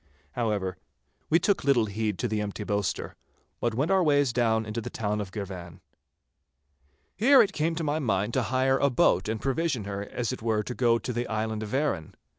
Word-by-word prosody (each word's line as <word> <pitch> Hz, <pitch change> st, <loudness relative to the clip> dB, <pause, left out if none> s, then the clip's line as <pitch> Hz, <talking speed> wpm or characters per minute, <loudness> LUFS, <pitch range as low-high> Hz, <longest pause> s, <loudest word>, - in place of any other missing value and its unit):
However, 105 Hz, -6 st, -1 dB, 0.5 s
we 160 Hz, -, +5 dB
took 200 Hz, +4 st, +1 dB
little 135 Hz, -5 st, +3 dB
heed 105 Hz, -1 st, -2 dB
to 120 Hz, -, -1 dB
the 110 Hz, -1 st, -1 dB
empty 105 Hz, 0 st, -4 dB
boaster, 100 Hz, -2 st, -2 dB, 0.4 s
but 120 Hz, -2 st, -1 dB
went 140 Hz, +9 st, 0 dB
our 190 Hz, -1 st, +4 dB
ways 145 Hz, -6 st, +3 dB
down 110 Hz, -2 st, +2 dB
into 110 Hz, +2 st, -4 dB
the -, -, -6 dB
town 105 Hz, -1 st, -2 dB
of 95 Hz, -2 st, -6 dB
Girvan. 90 Hz, -5 st, -7 dB, 1.4 s
Here 265 Hz, +7 st, +6 dB
it 195 Hz, -, -3 dB
came 165 Hz, 0 st, 0 dB
to 165 Hz, -, -3 dB
my 150 Hz, +1 st, 0 dB
mind 105 Hz, -4 st, 0 dB
to 130 Hz, -, +2 dB
hire 130 Hz, +2 st, +1 dB
a 140 Hz, -, +3 dB
boat 110 Hz, -5 st, +2 dB
and 110 Hz, 0 st, -2 dB
provision 135 Hz, -2 st, -1 dB
her 100 Hz, 0 st, -4 dB
as 120 Hz, +4 st, -3 dB
it 130 Hz, -, -7 dB
were 110 Hz, -1 st, 0 dB
to 125 Hz, -, -5 dB
go 120 Hz, -2 st, +3 dB
to 125 Hz, +2 st, -4 dB
the 120 Hz, +1 st, -2 dB
island 110 Hz, 0 st, -2 dB
of 105 Hz, -1 st, -5 dB
Arran. 135 Hz, -, -1 dB
115 Hz, 205 wpm, -27 LUFS, 105-135 Hz, 1.4 s, Here